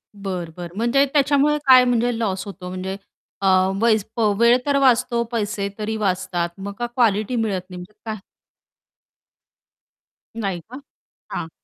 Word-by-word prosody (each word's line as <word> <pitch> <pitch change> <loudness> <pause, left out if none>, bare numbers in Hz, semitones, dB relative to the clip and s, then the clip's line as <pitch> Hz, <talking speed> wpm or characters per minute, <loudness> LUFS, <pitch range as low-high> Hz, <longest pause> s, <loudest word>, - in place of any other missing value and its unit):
बरं, 185 -4 -5
बरं. 175 +1 -8
म्हणजे 245 +5 +3
त्याच्यामुळे 285 +1 +3
काय 255 -1 +8
म्हणजे 240 -1 +1
लॉस 195 -4 -2
होतो 185 -2 -8
म्हणजे 185 +1 -5 0.4
अ, 195 - +1 0.3
वै 230 -2 +5 0.4
वेळ 235 +1 +6
तर 285 -1 +2
वाचतो, 245 -2 +3
पैसे 205 -3 -2
तरी 220 +1 -2
वाचतात, 185 -3 -1
मग 200 +1 -6
का 240 - -1
क्वालिटी 235 -1 +1
मिळत 210 -5 -1
नाही 180 - -8
म्हणजे 180 +4 -10
काय 220 -1 -3 2.2
नाही 195 -5 -2
का? 260 +3 -9 0.5
हां. 165 - -4
215 Hz, 140 wpm, -22 LUFS, 190-245 Hz, 2.2 s, काय